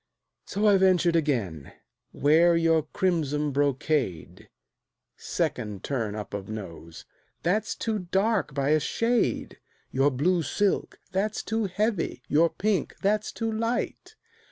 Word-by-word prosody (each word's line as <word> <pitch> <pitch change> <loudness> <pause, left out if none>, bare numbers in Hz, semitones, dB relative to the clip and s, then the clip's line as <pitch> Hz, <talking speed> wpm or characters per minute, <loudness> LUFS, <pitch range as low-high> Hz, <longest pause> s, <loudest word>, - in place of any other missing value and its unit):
So 205 +2 -1
I 205 -2 +6
ventured 180 -3 +4
again: 115 - -1 0.4
"Wear 165 +4 +4
your 165 -2 +2
crimson 150 -6 0
brocade;" 140 - -1 0.7
(Second 105 -3 -3
turn 115 -7 -2
up 105 -1 -7
of 100 -1 -5
nose) 85 -6 -8 0.4
"That's 205 +5 0
too 220 -2 -2
dark 190 -3 0
by 140 0 0
a 155 +1 +4
shade." 230 +8 0 0.3
"Your 135 +2 +3
blue 170 +7 +1
silk" 195 +7 0
"That's 200 +3 -1
too 225 -1 -1
heavy." 195 - -1
"Your 165 +3 +4
pink" 210 +2 -1
"That's 210 +2 +1
too 225 -1 -3
light." 230 - -2
165 Hz, 125 wpm, -27 LUFS, 135-205 Hz, 0.7 s, I